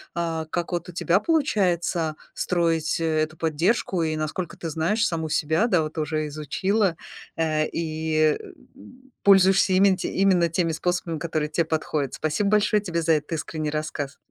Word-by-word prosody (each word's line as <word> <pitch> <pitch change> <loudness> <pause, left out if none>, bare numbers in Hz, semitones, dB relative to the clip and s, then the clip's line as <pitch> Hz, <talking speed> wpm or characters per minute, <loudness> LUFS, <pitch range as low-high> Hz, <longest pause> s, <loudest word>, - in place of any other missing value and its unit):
а, 165 -2 -2
как 175 +1 -3
вот 175 0 -3
у - - -6
тебя 175 +2 +2
получается 180 - +1 0.2
строить, 165 -3 0
э, - - -2 0.2
эту 155 +1 -3
поддержку 170 +4 0
и, 155 -1 -1
насколько 155 +3 -4
ты 165 - -5
знаешь, 170 +9 0
саму 160 -2 -2
себя, 160 +9 +1
да, 180 -8 +3
вот 155 +1 -7
уже 155 0 -1
изучила, 180 +6 0 0.4
э, 155 -1 +1
и, 155 -1 0 0.4
м, 260 +1 -17
пользуешься 195 -1 +5
именно 190 0 +4
те - - -3
именно 185 -3 +3
теми 170 0 0
способами, 170 -1 -2
которые 155 -2 -2
те 165 +2 +1
подходят. 155 -4 -2
Спасибо 155 +6 0
большое 210 0 +3
тебе 170 -4 -2
за 165 0 +3
этот 150 +1 -2
искренний 155 -1 -3
рассказ! 150 -2 -4
165 Hz, 165 wpm, -24 LUFS, 155-185 Hz, 0.4 s, пользуешься